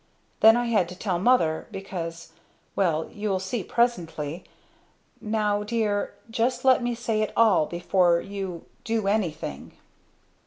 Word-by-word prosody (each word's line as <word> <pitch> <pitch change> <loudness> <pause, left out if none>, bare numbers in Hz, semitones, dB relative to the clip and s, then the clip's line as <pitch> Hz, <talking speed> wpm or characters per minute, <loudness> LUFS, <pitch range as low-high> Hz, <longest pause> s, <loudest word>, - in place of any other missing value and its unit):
Then 225 +1 +7
I 240 - 0
had 210 -7 +1
to 180 - -8
tell 185 -3 -1
mother 175 -8 +2
because 170 -4 -6 0.4
well 165 -5 +1
you'll 205 -2 -2
see 190 +3 -3
presently. 170 -9 -1 0.8
Now 210 -2 0
dear 210 -1 -1 0.2
just 235 +4 0
let 260 -1 +5
me 240 0 -1
say 225 -2 -1
it 215 - -1
all 210 -9 +4
before 175 0 +2
you 190 -3 -6 0.2
do 225 -2 -1
anything." 170 - -2
200 Hz, 130 wpm, -25 LUFS, 175-225 Hz, 0.8 s, Then